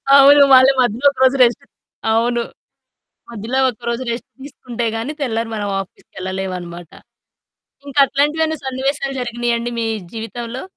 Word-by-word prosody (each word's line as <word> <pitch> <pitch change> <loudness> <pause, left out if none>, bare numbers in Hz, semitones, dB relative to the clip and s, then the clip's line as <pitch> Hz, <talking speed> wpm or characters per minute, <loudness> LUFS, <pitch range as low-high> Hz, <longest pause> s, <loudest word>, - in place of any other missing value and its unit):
అవును. 280 +1 +8
మళ్లీ 260 +1 +7
మధ్యలో 245 +3 +1
ఒక 270 - -14
రోజు 260 +1 +4
రెస్ట్ 240 -1 +1 0.5
అవును. 235 +2 +1 0.9
మధ్యలో 235 +3 -3
ఒక 240 0 -17
రోజు 235 +2 -3
రెస్ట్ 235 - -5
తీసుకుంటే 250 -4 -6
గాని 230 +6 -3
తెల్లారి 230 -4 -2
మనం 205 -1 -3
ఆఫీస్‌కి 195 - -12
ఎళ్ళలేమన్నమాట. 185 -3 -5 1.0
ఇంకా 280 0 -5
అట్లాంటివేవన్నా 310 +3 0
సన్నివేశాలు 270 +1 -2
జరిగినాయా 240 -1 -1
అండి 235 +1 -4
మీ 225 - -1 0.3
జీవితంలో? 230 +2 -6
240 Hz, 135 wpm, -18 LUFS, 225-270 Hz, 1.0 s, అవును